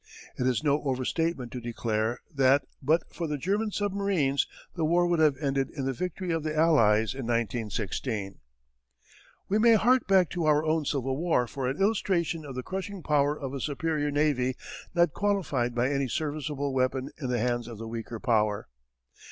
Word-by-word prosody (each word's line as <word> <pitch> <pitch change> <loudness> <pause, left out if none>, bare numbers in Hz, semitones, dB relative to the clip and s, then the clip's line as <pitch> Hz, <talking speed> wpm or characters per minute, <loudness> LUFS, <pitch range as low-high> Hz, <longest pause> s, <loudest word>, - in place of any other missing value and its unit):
It 125 - 0
is 130 +3 +1
no 145 0 +2
overstatement 135 0 -1
to 125 - -5
declare 115 -1 -2
that 135 0 +4 0.2
but 155 +5 +2
for 170 - -3
the 150 -1 -2
German 205 +8 0
submarines 200 -9 0 0.3
the 170 - -2
war 170 +3 +3
would 175 -1 +1
have 150 -4 +4
ended 135 -2 0
in 140 -5 -5
the 135 - 0
victory 180 +5 -3
of 165 -1 0
the 155 0 -3
Allies 115 -10 +4
in 130 -3 -5
1916. 110 -2 -2 1.1
We 205 +2 +2
may 230 +1 +6
hark 245 +3 +3
back 190 -3 +4
to 170 -2 -1
our 150 0 +3
own 155 -1 +1
Civil 135 -2 -1
War 160 -6 +2
for 130 +2 -4
an 135 +3 -2
illustration 185 -6 +1
of 135 -3 -7
the 125 - -4
crushing 190 +1 -5
power 145 0 +2
of 135 -1 -5
a 140 - -3
superior 150 0 -1
navy 145 -4 +1 0.4
not 170 -4 +3
qualified 150 -13 0
by 125 +3 +1
any 140 -1 0
serviceable 145 -1 -2
weapon 130 0 0
in 130 -5 -3
the 125 - +1
hands 120 0 -1
of 115 -2 -8
the 115 +1 -7
weaker 115 0 -6
power. 105 - +1
140 Hz, 180 wpm, -28 LUFS, 125-165 Hz, 1.1 s, may